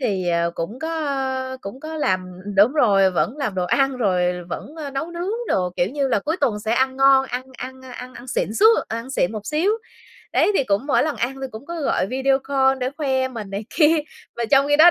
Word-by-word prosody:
thì, 195 -8 -1
ờ, 170 0 +1
cũng 205 +10 -5
có, 320 - -4 0.2
ơ, 265 -2 -2
cũng 225 +7 -8
có 315 +1 -6
làm 185 -10 0 0.3
đúng 210 +6 +6
rồi, 200 -10 +4
vẫn 210 +8 0
làm 265 -10 -2
đồ 180 -1 0
ăn 270 +7 +1
rồi 180 -5 0
vẫn, 275 - -7
ơ, 295 -3 -5
nấu 275 +5 -4
nướng 350 +3 -3 0.2
đồ, 180 -1 +1
kiểu 175 - +2
như 280 -1 0
là, 235 - +2
cuối 315 - -1
tuần 235 -7 +1
sẽ 220 +1 -1
ăn 260 +2 +1
ngon, 270 0 +5
ăn 250 +1 -3 0.2
ăn 260 +1 -7
ăn 255 0 -9
ăn 245 - -11
xịn 220 -3 -2
xú 430 - +5 0.2
ăn 230 +4 -5
xịn 215 -7 0
một 210 -1 -6
xíu. 325 +7 +1 0.6
Đấy - - +3
thì 275 - +2
cũng 205 +3 0
mỗi 290 - +3
lần 305 -1 -1
ăn 250 +3 -1
thì 265 - -3
cũng 220 +5 -10
có 340 -1 -5
gọi 230 -8 +1
video 265 +3 +1
call 265 -1 +1
để 255 0 -1
khoe 265 -4 0
mình 220 -6 -7
này 200 +2 -4
kia, 320 0 +4 0.4
mà 235 - -1
trong 275 0 +5
khi 290 - +4
đó 335 +3 +9
260 Hz, 240 wpm, -22 LUFS, 210-275 Hz, 0.6 s, đó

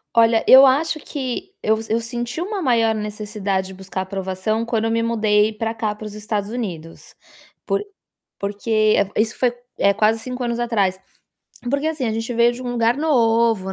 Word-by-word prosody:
Olha, 230 -1 +4
eu 265 +1 +10
acho 310 +4 +2
que 290 +9 -5
eu 220 0 +2
eu 225 +2 +2
senti 240 +5 -4
uma 395 +1 -3
maior 230 -5 +2
necessidade 210 -2 -3
de 190 - -10
buscar 190 0 -5
aprovação 190 +3 -2
quando 230 -1 -1
eu 225 - 0
me 230 0 +1
mudei 215 -2 +2
para 225 +1 -3
cá 220 -2 -2
para 210 +1 -10
os 210 -1 -8
Estados 210 -1 -3
Unidos. 180 -9 -7 0.5
Por 400 - 0 0.5
porque, 215 +2 +1
eh, 200 - +1
isso 225 0 -2
foi, 245 -1 +1 0.2
eh, 200 - +3
quase 215 +2 +2
5 250 +2 -6
anos 235 -1 -2
atrás. 205 -6 0 0.7
Porque 280 +3 0
assim, 300 -7 -1
gente 225 +2 -3
veio 235 +1 +4
de 245 +1 -8
um 245 - -4
lugar 235 0 +2
novo, 230 -9 +2
225 Hz, 180 wpm, -21 LUFS, 210-240 Hz, 0.7 s, eu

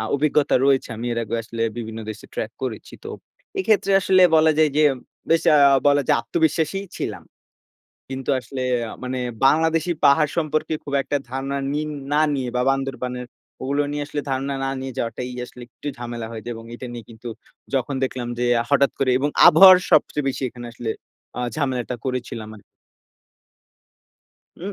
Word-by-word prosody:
আ - - -2
অভিজ্ঞতা 145 0 +2
রয়েছে, 135 -1 +2
আমি 120 +2 -5
এর 115 - -2
আগে 110 +2 -4
আসলে 115 0 -5 0.2
বিভিন্ন 110 -1 -6
দেশে 110 - -9
ট্রাক - - -3
করেছি। - - -5
তো - - -6 0.5
এক্ষেত্রে 215 - +2
আসলে 185 0 +4
বলা 160 0 +5
যায়, 155 -1 +4
যে 155 - +4 0.5
বেশ 165 - +4
আ - - +7 0.3
বলা 145 0 +4
যায় - - +5
আত্মবিশ্বাসীই 160 +8 0
ছিলাম। - - -4 0.9
কিন্তু 135 +1 -4
আসলে 130 +2 -6 0.3
আ - - -7
মানে 130 0 -3 0.3
বাংলাদেশী 160 +3 +2
পাহাড় 150 +1 +5
সম্পর্কে 155 -1 0
খুব 140 - -5
একটা 145 - -1
ধারণা 135 +1 -3 0.2
নি 150 - 0 0.3
না 150 - +3
নিয়ে 130 -2 -2
বা 125 - +2
বান্দরবানের 130 -2 -3 0.4
ওগুলো 140 +2 0
নিয়ে 145 0 -2
আসলে 145 - -3
ধারণা 135 +1 -1
না 135 - -1
নিয়ে 130 0 -5
যাওয়াটাই 120 +2 -3 0.2
আসলে 125 - -13
একটু 145 - -8
ঝামেলা 120 -1 -5
হয়ে 110 -1 -7
যায়, 120 - -4
এবং 115 - -10
এটা 125 - -7
নিয়ে 120 -2 -8
কিন্তু 115 +1 -9 0.5
যখন 135 +2 0
দেখলাম, 130 -2 -4
যে 125 - 0 0.3
হঠাৎ 140 -1 +4
করে 135 -1 +2
এবং 145 - 0 0.2
আবহাওয়ার 185 +3 +9
সবচেয়ে 150 -2 +3
বেশি 135 - -3
এখানে 120 0 -10
আসলে 115 -1 -4 0.5
আ - - -1 0.2
ঝামেলাটা 130 -4 -2
করেছিলাম 125 -4 -4
আর 105 - -16 2.0
উম 195 +4 -5
135 Hz, 170 wpm, -22 LUFS, 120-150 Hz, 2.0 s, আবহাওয়ার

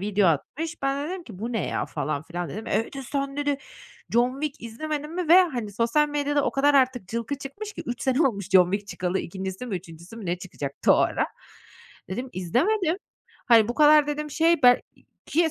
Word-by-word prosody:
video 200 -2 +2
atmış, 310 - -2
ben 275 +1 0
de - - -5
dedim 375 -1 -5
ki: 210 - -11
"Bu 230 +4 -4
ne 220 -8 -1
ya?" - - -2
falan 145 0 -3
filan 175 +1 -5
dedim. 215 +9 -7
"E,", 225 - +1
dedi, 275 +2 -8
"Sen", 275 +1 -3
dedi, 290 -1 0 0.5
"John 245 +3 +2
Wick 300 -2 -3
izlemedin 300 +6 -4
mi?" 355 -3 -2
ve, 365 +3 +9
hani, 240 - -3
sosyal 235 +8 +2
medyada 290 -1 0
o - - +1
kadar 285 +1 +3
artık 255 -7 +2
cılkı 235 +6 -3
çıkmış 405 +11 -7
ki - - -7
3 245 0 -4
sene 265 +3 +3
olmuş 200 -7 -3
John 180 -2 +6
Wick 200 0 -2
çıkalı, 180 +1 -2
2'ncisi 190 +5 -5
mi, 210 -6 -2
3'üncüsü 170 +3 -11
mü 220 -4 -7
ne 175 +1 -1
çıkacaktı 145 -6 0
o - - +4
ara. - - +1 0.8
Dedim, 245 +8 -4
"İzlemedim. 320 - +1 0.5
Hani, 225 -3 +6
bu 240 - -2
kadar", 300 0 +6
dedim, 300 0 -3
"şey 325 +1 +2
ben" 245 0 +7 0.5
ki 325 +1 +2
250 Hz, 205 wpm, -25 LUFS, 200-295 Hz, 0.8 s, ve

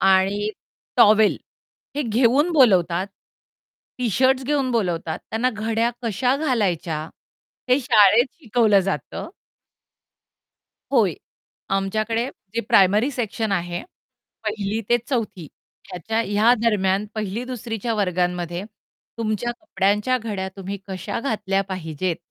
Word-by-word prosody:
आणि 195 +2 +3 0.5
टॉवेल 215 0 +6 0.6
हे 295 - +1
घेऊन 255 +7 +2
बोलवतात. 190 - +4 0.9
टी-शर्ट्स 260 +3 +2
घेऊन 275 -2 0
बोलावतात 175 -8 -1
त्यांना 235 +3 +1
घड्या 225 +1 0
कश्या 240 +4 +1
घालायच्या 200 - 0 0.7
हे 255 +2 +5
शाळेत 230 -2 +5
शिकवलं 220 -5 +3
जातं. 195 +1 -4 1.6
होय. 210 - +3 0.6
आमच्याकडे 215 +5 0 0.3
जे 230 - +1
प्रायमरी 210 +3 +4
सेक्शन 225 -4 -2
आहे, 175 -2 -2 0.6
1ली 210 0 -2
ते 240 0 +4
4थी 215 - -2 0.4
ह्याच्या 185 +6 -3
ह्या 210 +4 +4
दरम्यान 200 -3 +2
1ली 215 +2 -3
2री 240 -3 -5
च्या 230 +3 -2
वर्गांमध्ये 180 -3 -1 0.6
तुमच्या 225 +2 -1
कपड्यांच्या 210 -2 +1
घड्या 205 -4 -4
तुम्ही 195 +1 -5
कशा 190 +2 -4
घातल्या 210 -6 0
पाहिजेत, 170 -1 -3
215 Hz, 105 wpm, -22 LUFS, 190-240 Hz, 1.6 s, टॉवेल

